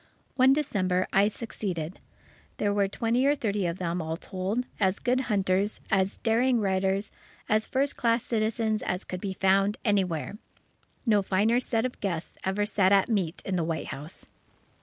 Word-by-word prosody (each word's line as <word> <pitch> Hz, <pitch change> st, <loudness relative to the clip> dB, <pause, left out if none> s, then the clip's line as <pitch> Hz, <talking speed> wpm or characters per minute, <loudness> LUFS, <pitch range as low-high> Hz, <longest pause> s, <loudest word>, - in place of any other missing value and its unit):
One 260 Hz, 0 st, +6 dB
December, 190 Hz, -11 st, +1 dB
I 200 Hz, +1 st, +5 dB
succeeded. 190 Hz, -6 st, -4 dB, 0.6 s
There 205 Hz, -1 st, +1 dB
were 200 Hz, -1 st, +2 dB
twenty 235 Hz, +6 st, +1 dB
or 290 Hz, -, +4 dB
thirty 205 Hz, -8 st, -1 dB
of 170 Hz, +1 st, -3 dB
them, 175 Hz, -1 st, -2 dB
all 160 Hz, 0 st, -3 dB
told, 195 Hz, +8 st, -3 dB
as 190 Hz, -2 st, +2 dB
good 250 Hz, +1 st, +1 dB
hunters, 195 Hz, 0 st, +1 dB
as 195 Hz, -1 st, +1 dB
daring 240 Hz, +2 st, +2 dB
riders, 195 Hz, 0 st, 0 dB, 0.4 s
as 215 Hz, +1 st, +1 dB
first 275 Hz, +2 st, 0 dB
class 230 Hz, 0 st, +2 dB
citizens 220 Hz, -1 st, 0 dB
as 180 Hz, -, -2 dB
could 185 Hz, -1 st, -6 dB
be 195 Hz, -2 st, -3 dB
found 195 Hz, +2 st, +2 dB
anywhere. 195 Hz, -2 st, 0 dB, 0.7 s
No 210 Hz, -4 st, +4 dB
finer 205 Hz, +5 st, +2 dB
set 230 Hz, -2 st, 0 dB
of 255 Hz, -, -4 dB
guests 175 Hz, -5 st, -3 dB
ever 195 Hz, +2 st, 0 dB
sat 200 Hz, -2 st, +2 dB
at 200 Hz, +2 st, +4 dB
meat 190 Hz, -6 st, -1 dB
in 190 Hz, -2 st, -1 dB
the 170 Hz, -, +1 dB
White 160 Hz, 0 st, -3 dB
House. 150 Hz, +5 st, -8 dB
200 Hz, 165 wpm, -27 LUFS, 185-225 Hz, 0.7 s, One